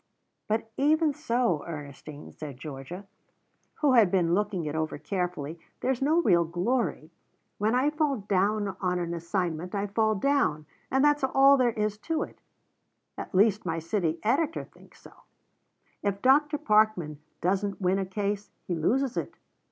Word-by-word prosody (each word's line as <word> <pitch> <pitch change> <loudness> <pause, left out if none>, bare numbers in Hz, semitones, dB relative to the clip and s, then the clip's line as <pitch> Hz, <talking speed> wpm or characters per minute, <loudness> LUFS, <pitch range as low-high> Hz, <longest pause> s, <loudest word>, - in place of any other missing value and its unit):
"But 220 +1 -1
even 305 +2 +3
so, 240 - 0
Ernestine," 145 -1 -8
said 145 -4 -8
Georgia, 150 +7 -8 0.8
who 290 -4 +4
had 225 -6 +6
been 175 -2 +2
looking 200 -3 0
it 150 - -3
over 160 0 -2
carefully, 170 -1 -3 0.2
"there's 260 -1 0
no 310 +5 +3
real 175 - +4
glory. 175 0 -1 0.5
When 215 +3 +2
I 270 +4 +2
fall 300 -3 0
down 205 0 0
on 180 -1 0
an 170 -1 -2
assignment, 170 +1 -3
I 200 0 0
fall 215 +1 +1
down, 240 - +1 0.2
and 265 +2 +3
that's 295 -1 +3
all 270 +1 +6
there 250 -3 +2
is 210 -1 -2
to 325 +7 -1
it - - -11 0.8
at - - -7
least 210 +2 +4
my 165 -2 -2
city 165 0 -1
editor 285 +8 +1
thinks - - -19
so. - - -15 0.9
If 200 -1 -2
Dr. 295 +3 +4
Parkman 215 - +2 0.2
doesn't 195 +2 -1
win 190 0 +1
a 195 - -1
case, 205 +1 -3 0.2
he 180 - -2
loses 245 - 0
it. - - -3
200 Hz, 155 wpm, -28 LUFS, 170-255 Hz, 0.9 s, had